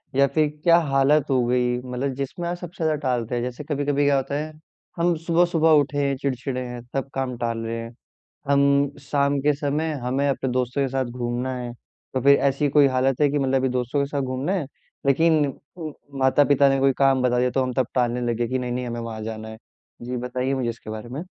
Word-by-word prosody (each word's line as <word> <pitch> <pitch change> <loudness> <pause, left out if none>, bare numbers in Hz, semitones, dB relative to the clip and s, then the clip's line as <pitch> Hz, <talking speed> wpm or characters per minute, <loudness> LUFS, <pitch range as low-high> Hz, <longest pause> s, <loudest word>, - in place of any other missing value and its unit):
या 140 +1 +5
फिर 155 +1 +2 0.2
क्या 170 -1 +6
हालत 135 +2 +4
हो 130 -2 +2
गई, 125 0 +1
मतलब 130 +2 -3
जिसमें 140 +6 -4
आप 175 - -3
सबसे 175 0 -7
ज़्यादा 155 -1 +2
टालते 125 -3 -1
हैं? 120 - -1
जैसे 125 +3 -5
कभी-कभी 145 -1 0
क्या 140 0 +4
होता 135 +1 -2
है, 155 +2 -3 0.5
हम 170 0 +2
सुबह-सुबह 170 -1 +3
उठे 145 +1 -4
हैं, 140 - 0
चिड़चिड़े 130 -1 -2
हैं, 120 -1 -7
सब 135 0 -2
काम 130 -2 -3
टाल 115 -1 -2
रहे 115 +1 -3
हैं। 115 0 -7 0.6
हम 140 0 +4
शाम 140 0 0
के 150 +2 +3
समय, 150 +2 -1
हमें 135 +3 0
अपने 135 -1 -1
दोस्तों 125 +2 -1
के 135 - +1
साथ 135 -1 0
घूमना 120 +1 -3
है, 120 -1 -5 0.4
तो 130 - 0
फिर 140 +2 +6
ऐसी 140 +2 0
कोई 145 0 +5
हालत 130 +1 +1
है 145 - +5
कि 145 +1 0
मतलब 135 -1 +1
अभी 130 0 +2
दोस्तों 125 +2 -1
के - - -1
साथ 145 - -1
घूमना 130 +6 -2
है, 180 -7 -1 0.4
लेकिन 155 +2 +4 0.3
म 155 -2 -5 0.3
माता-पिता 140 +1 +4
ने 135 0 +2
कोई 135 0 +4
काम 135 -1 +3
बता 125 -1 +2
दिया, 125 0 +2
तो 135 - +1
हम 130 0 -2
तब 130 0 0
टालने 125 -1 +1
लगे 120 +1 -1
कि 130 +2 -1
नहीं-नहीं, 125 0 -3
हमें 120 0 -4
वहाँ 115 -1 -6
जाना 110 0 -6
है। 110 - -9 0.4
जी, 125 +1 -4
बताइए 125 +2 -2
मुझे 130 -3 -1
इसके 115 -1 -8
बारे 110 +2 -6
में। 135 +5 -5
135 Hz, 220 wpm, -23 LUFS, 125-145 Hz, 0.6 s, क्या